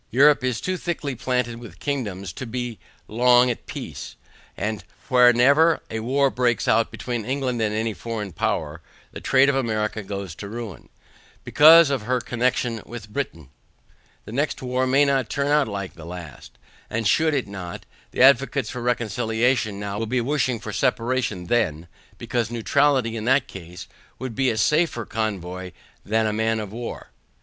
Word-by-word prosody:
Europe 140 +4 +5
is 125 -2 0
too 185 0 -2
thickly 160 -6 -3
planted 125 -1 -2
with 110 -8 -11
kingdoms 100 - -3
to 130 - -7
be 120 -1 -4 0.3
long 125 +2 +4
at 120 - -8
peace, - - -7 0.4
and 105 0 -3 0.3
whenever 130 +6 +5
a 110 - -2
war 135 +4 +1
breaks 120 -2 0
out 115 +1 +3
between 120 -3 -4
England 130 -1 -2
and 105 -1 0
any 110 0 -1
foreign 110 -3 -5
power, 80 0 -2 0.3
the - - -9
trade 135 0 +4
of 140 - +3
America 110 -4 -1
goes 100 -3 -6
to 100 +4 -8
ruin, 115 -4 -8 0.5
BECAUSE 160 0 +7
OF 135 -4 0
HER 125 +4 0
CONNECTION 120 -1 -1
WITH 115 -2 -9
BRITAIN. 80 - -4 0.8
The - - -9
next 145 +3 -2
war 130 +1 0
may 135 +3 +4
not 135 -5 +1
turn 140 - -1
out 150 -2 +3
like 100 -3 -5
the 80 - -12
last, 85 -4 -10 0.3
and 110 -1 -1
should 155 +4 +3
it 130 -6 -1
not, 95 -3 -7 0.2
the - - +2
advocates 135 -2 +4
for 125 - -5
reconciliation 120 -2 0
now 100 0 -4
will 115 - -2
be 125 +3 0
wishing 130 -1 0
for 110 -1 -7
separation 115 -7 0
then, 85 -7 0 0.3
because, 120 -2 -2
neutrality 125 0 +1
in 110 -1 -4
that 135 +1 +3
case, 90 -6 -10 0.3
would 130 -3 -5
be 130 +3 +1
a 110 - -1
safer 150 -3 +1
convoy 95 -4 -4 0.3
than 110 +2 +1
a 105 - 0
man 110 +1 0
of 105 -2 -6
war. 120 +2 -7
120 Hz, 170 wpm, -23 LUFS, 105-130 Hz, 0.8 s, BECAUSE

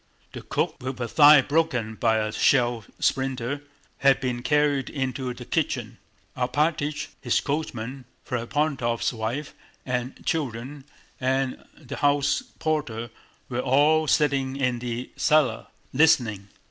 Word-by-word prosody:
The - - -7
cook, - - -2
with 130 0 -4
her 125 - -2
thigh 145 +4 +7
broken 135 -8 0
by 110 0 +2
a 110 0 -1
shell 120 -1 +2
splinter, 135 +1 -1 0.4
had 135 -1 +4
been 125 -2 -2
carried 145 0 +1
into 130 -2 -3
the - - -9
kitchen. - - -2 0.4
Alpátych, 145 +4 0
his - - +2
coachman, 135 -3 -4 0.2
Ferapóntov's 125 -1 -1
wife 120 +6 -4 0.3
and 125 0 -3
children 135 - -3 0.3
and 130 0 -1
the 140 -6 -8
house 145 - +2 0.2
porter 120 -8 -2 0.4
were 125 -1 -3
all 150 +5 +3
sitting 135 -3 +2
in 125 -3 0
the 120 0 -5
cellar, 145 -7 +2 0.3
listening. 125 -10 +3
130 Hz, 120 wpm, -25 LUFS, 120-145 Hz, 0.4 s, thigh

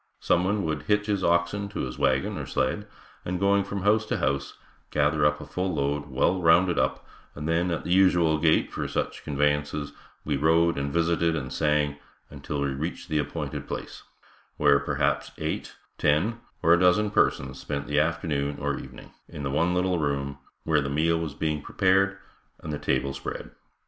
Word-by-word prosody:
Someone 95 +4 +1
would 80 -2 -2
hitch 105 0 +2
his 100 -3 -1
oxen 85 +4 +1
to 100 - -4
his 65 +1 -5
wagon 65 -1 +1
or - - -5
sled, - - -1 0.4
and 90 0 -3
going 100 +1 +3
from 100 -1 -5
house 105 +2 +3
to - - -1
house, 70 +1 -1 0.3
gather 75 0 +2
up 75 0 -1
a - - -8
full 90 -1 -2
load 75 +1 -1
well 90 +7 +1
rounded 85 +2 +4
up - - -1 0.3
and 75 +1 -5
then 85 +2 +1
at 85 -2 -2
the - - -4
usual 90 -4 +4
gait 80 0 +3
for - - -3
such - - -3
conveyances, 75 0 -1 0.3
we 75 -2 0
rode 80 +3 +3
and 70 0 -2
visited 85 +1 +1
and 65 -5 -4
sang 75 -2 +1 0.3
until 70 -1 -4
we 70 - 0
reached 80 +5 -5
the 75 -1 +1
appointed 75 0 -4
place, - - -6 0.6
where 70 -1 +5
perhaps, 70 - -1
eight, - - -4 0.2
ten 95 +11 +1 0.2
or 85 - +6
a 85 - +4
dozen 90 +4 +3
persons - - +1
spent 70 -1 -4
the 75 0 +1
afternoon 75 -3 -1
or 70 0 -2
evening, - - -11 0.2
in 75 - -7
the 70 - -2
one 85 +5 +1
little 90 -1 +1
room, 70 -2 -2 0.2
where 75 -2 +2
the 70 - -3
meal 80 +4 +1
was 80 -4 -4
being 75 -2 -1
prepared 95 +3 +2 0.4
and 75 - -5
the 75 - -3
table 70 0 0
spread. 70 0 -6
80 Hz, 185 wpm, -26 LUFS, 70-90 Hz, 0.6 s, or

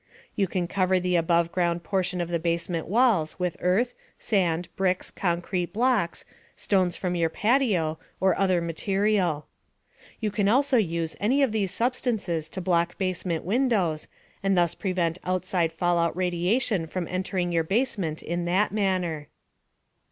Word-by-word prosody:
You 195 -2 +1
can 180 -1 -2
cover 185 0 +2
the 180 0 0
above 170 0 +2
ground 175 -1 0
portion 185 0 -1
of 170 - -3
the 170 -1 0
basement 170 0 -2
walls 205 -6 +2
with 180 -2 -1
earth, 215 +8 +2 0.2
sand, 175 -5 0
bricks, 185 -1 0
concrete 175 0 -2
blocks, 230 -6 +1 0.3
stones 185 -3 +1
from 180 -2 -2
your 170 -2 +1
patio, 200 - +1 0.2
or 190 -1 +3
other 185 -3 +2
material. 185 -1 0 0.7
You 215 -2 -1 0.2
also 260 +3 +3
can 200 -7 +1
use 165 -1 -2
any 260 +7 +2
of 265 - +2
these 210 -3 0
substances 220 -10 -1
to 190 - -6
block 170 -2 +1
basement 185 -3 -2
windows 200 -7 +1 0.3
and 195 -1 +1
thus 175 -2 +3
prevent 180 -3 -1
outside 185 -2 0
fallout 170 0 +1
radiation 180 +2 0
from 175 +1 -4
entering 185 -1 -2
your 165 -1 +2
basement 195 -5 -1
in 170 +1 -2
that 185 +4 +2
manner. 185 -7 -1
180 Hz, 145 wpm, -26 LUFS, 170-200 Hz, 0.7 s, or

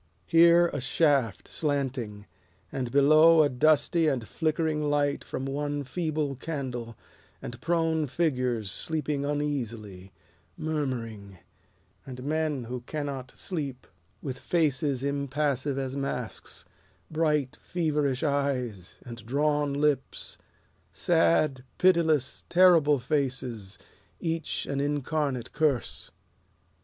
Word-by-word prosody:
Here 170 +1 +6
a 145 - -2
shaft, 135 -3 +1
slanting, 130 -8 -2 0.5
and 125 -3 -3
below 155 +4 +6
A 145 - +2
dusty 155 +4 +3
and 125 -7 -1
flickering 155 -2 0
light 145 -1 +1
from 130 - -5
one 145 +1 -2
feeble 155 -1 -2
candle 125 -6 -5 0.4
And 120 +1 -8
prone 165 -2 +1
figures 125 - 0
sleeping 150 0 -1
uneasily, 115 -10 -3 0.5
Murmuring, 115 -10 -4 0.7
And 125 -1 -8
men 150 -2 -1
who 125 +1 -5
cannot 140 -1 -5
sleep, 140 -8 -5 0.4
With 130 -3 -4
faces 145 -5 +1
impassive 140 0 -1
as 135 -1 -3
masks, 140 -9 -5 0.5
Bright, 150 -4 0
feverish 150 -6 -1
eyes, 130 - -1
and 120 -2 -9
drawn 145 +4 +1
lips, 145 -1 -1 0.5
Sad, 125 - +2
pitiless, 160 -7 +3
terrible 170 -5 +6
faces, 125 -6 -2 0.4
Each 165 0 -2
an 140 - -2
incarnate 145 -3 -1
curse. 145 -6 +1
140 Hz, 100 wpm, -28 LUFS, 125-155 Hz, 0.7 s, Here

